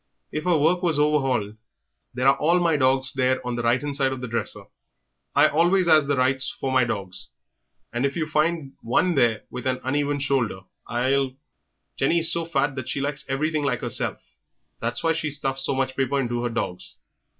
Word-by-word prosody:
If 155 Hz, 0 st, -4 dB
her 175 Hz, -3 st, +3 dB
work 165 Hz, +4 st, +2 dB
was 170 Hz, -5 st, +1 dB
overhauled 135 Hz, -8 st, +1 dB, 0.3 s
" -, -, -53 dB
"There 130 Hz, +1 st, +1 dB
are 135 Hz, -, +6 dB
all 170 Hz, +5 st, +3 dB
my 170 Hz, -2 st, +2 dB
dogs 130 Hz, -1 st, +2 dB
there 130 Hz, -1 st, +1 dB
on 125 Hz, -1 st, -2 dB
the 120 Hz, -, -2 dB
right 120 Hz, +2 st, +2 dB
hand 145 Hz, 0 st, -3 dB
side 135 Hz, -2 st, +1 dB
of 130 Hz, -, -4 dB
the 125 Hz, -, -5 dB
dresser 115 Hz, 0 st, -3 dB, 0.7 s
I -, -, +6 dB
always 175 Hz, +4 st, +2 dB
'as 155 Hz, -3 st, +5 dB
the 140 Hz, -1 st, +1 dB
right 130 Hz, +1 st, +2 dB, 0.2 s
for 135 Hz, -, -2 dB
my 130 Hz, -1 st, +3 dB
dogs 95 Hz, -5 st, -5 dB, 0.7 s
and 120 Hz, +2 st, -1 dB
if 140 Hz, 0 st, 0 dB
you 165 Hz, -2 st, -1 dB
find 155 Hz, -2 st, 0 dB
one 175 Hz, +10 st, +1 dB
there 115 Hz, -7 st, +2 dB
with 125 Hz, +1 st, -5 dB
an 130 Hz, 0 st, 0 dB
uneven 145 Hz, +2 st, 0 dB
shoulder 130 Hz, -8 st, 0 dB, 0.3 s
I'll 130 Hz, +2 st, 0 dB, 0.3 s
" -, -, -52 dB
"Jennie 140 Hz, +5 st, +2 dB
is 165 Hz, -1 st, +3 dB
so 170 Hz, -1 st, -1 dB
fat 145 Hz, -3 st, 0 dB
that 130 Hz, -1 st, -5 dB
she -, -, -2 dB
likes 140 Hz, 0 st, -3 dB
everything 155 Hz, +3 st, 0 dB
like 140 Hz, -, -1 dB
'erself; -, -, -2 dB, 0.6 s
that's -, -, -2 dB
why 165 Hz, 0 st, +3 dB
she 155 Hz, -1 st, -2 dB
stuffs 135 Hz, -2 st, -1 dB
so 135 Hz, -, 0 dB
much 130 Hz, 0 st, -1 dB
paper 135 Hz, +1 st, 0 dB
into 120 Hz, -2 st, -1 dB
her 120 Hz, -, -1 dB
dogs." 90 Hz, -6 st, -4 dB
135 Hz, 205 wpm, -24 LUFS, 130-155 Hz, 0.7 s, are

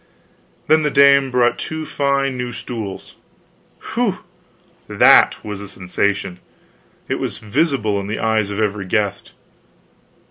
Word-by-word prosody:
Then 155 Hz, 0 st, +4 dB
the 150 Hz, -, +1 dB
dame 140 Hz, -1 st, +5 dB
brought 125 Hz, -1 st, +1 dB
two 160 Hz, 0 st, -5 dB
fine 140 Hz, -2 st, -1 dB
new 125 Hz, -1 st, -4 dB
stools 110 Hz, -5 st, -7 dB, 0.8 s
whew! -, -, -1 dB, 0.6 s
that -, -, +5 dB
was 105 Hz, -2 st, -6 dB
a 100 Hz, -, -8 dB
sensation; 95 Hz, 0 st, -2 dB, 0.7 s
it -, -, -2 dB
was -, -, -4 dB
visible 110 Hz, -3 st, 0 dB
in 100 Hz, -, -6 dB
the 110 Hz, -, -3 dB
eyes 110 Hz, -2 st, 0 dB
of 100 Hz, 0 st, -4 dB
every 105 Hz, -2 st, -1 dB
guest. 100 Hz, 0 st, -2 dB
110 Hz, 130 wpm, -19 LUFS, 100-140 Hz, 0.8 s, dame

